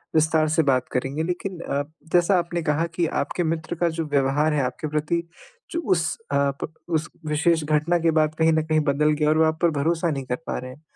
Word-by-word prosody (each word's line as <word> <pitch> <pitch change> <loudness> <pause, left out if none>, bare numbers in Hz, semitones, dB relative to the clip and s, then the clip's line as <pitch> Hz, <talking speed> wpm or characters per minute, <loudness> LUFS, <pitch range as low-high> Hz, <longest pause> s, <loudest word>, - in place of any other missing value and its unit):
विस्तार 155 0 +3
से 160 +1 +3
बात 130 -3 +2
करेंगे। 135 +5 -1
लेकिन 180 +1 -4
अ, 140 -3 -2 0.3
जैसा 180 +2 +4
आपने 170 0 -2
कहा 155 +2 +1
कि 170 -1 +1
आपके 175 +5 -2
मित्र 160 +1 -2
का 170 0 +1
जो 160 -1 -3
व्यवहार 145 +2 +2
है 145 - +1
आपके 125 +4 -3
प्रति 155 +3 0 0.5
जो 335 - -1
उस 170 -3 +1
अ, 140 0 +2
प 160 - -6 0.2
उस 155 -2 0 0.2
विशेष 160 +2 +2
घटना 155 +3 +2
के 165 0 +2
बाद 155 -1 +2
कहीं 160 0 +4
न 160 - +2
कहीं 155 0 +2
बदल 150 +2 +2
गया 150 -1 +3
और 155 - +3
वो 160 - +5
आप 160 0 0
पर 170 - +4
भरोसा 165 +2 +1
नहीं 135 -2 -3
कर 125 - -1
पा - - -2
रहे 130 0 -7
हैं। 145 - -15
155 Hz, 230 wpm, -24 LUFS, 150-165 Hz, 0.5 s, वो